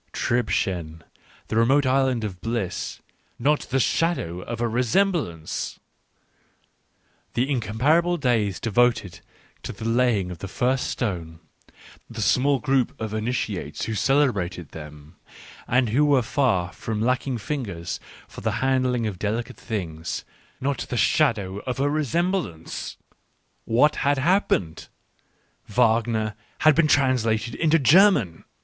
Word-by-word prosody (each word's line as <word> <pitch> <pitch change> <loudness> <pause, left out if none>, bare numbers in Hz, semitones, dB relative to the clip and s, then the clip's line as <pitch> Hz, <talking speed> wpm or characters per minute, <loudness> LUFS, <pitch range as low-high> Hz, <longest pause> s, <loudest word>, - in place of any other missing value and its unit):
Tribschen 90 -9 -1 0.2
— - - -29
remote 130 +6 +3
island 130 -2 +2
of 95 -4 -5
bliss: 115 -6 -3 0.4
not 145 +5 +2
the 135 - +1
shadow 125 - 0
of 115 +4 -6
a - - -1
resem 125 - +2
blance! 85 - -4 1.6
The 125 +3 +1
incomparable 140 +9 +2
days 115 - 0
devoted 115 -6 +1 0.4
to - - -6
the 110 - -8
lay 120 -1 +2
ing 90 -1 -6
of 85 - -8
the 100 - -6
first 125 +6 0
stone, 85 -8 -3 0.7
the 115 - -8
small 135 +5 +3
group 135 -2 0
of 110 -1 -4
the 110 - -2
initi 110 -4 -2
ated 75 - -7
who 115 - -2
celebrated 100 - +1
them, 75 +1 -11 0.5
and 125 -1 +2
who 130 +7 +3
were 140 -4 +4
far 110 -8 0
from 110 -2 -4
lacking 125 +2 0
fingers 100 - -4 0.3
for - - -11
the 110 +1 -1
handling 130 0 +1
of 100 -5 -4
delicate 110 +3 -3
things: 85 -8 -4 0.3
not 135 0 -1
the 125 - -2
shadow 105 -6 +2
of 125 0 -2
a 140 - +2
resemblance! 155 - -2 0.7
What 130 +7 +3
had 145 0 +1
hap 180 +9 +2
penedt 80 -4 -1 0.4
— 115 - -42
Wagner 115 -2 +2 0.3
had 155 0 +6
been 160 +1 +3
translated 120 -5 +2
into 165 0 +3
German! 145 - +4
120 Hz, 135 wpm, -24 LUFS, 100-135 Hz, 1.6 s, had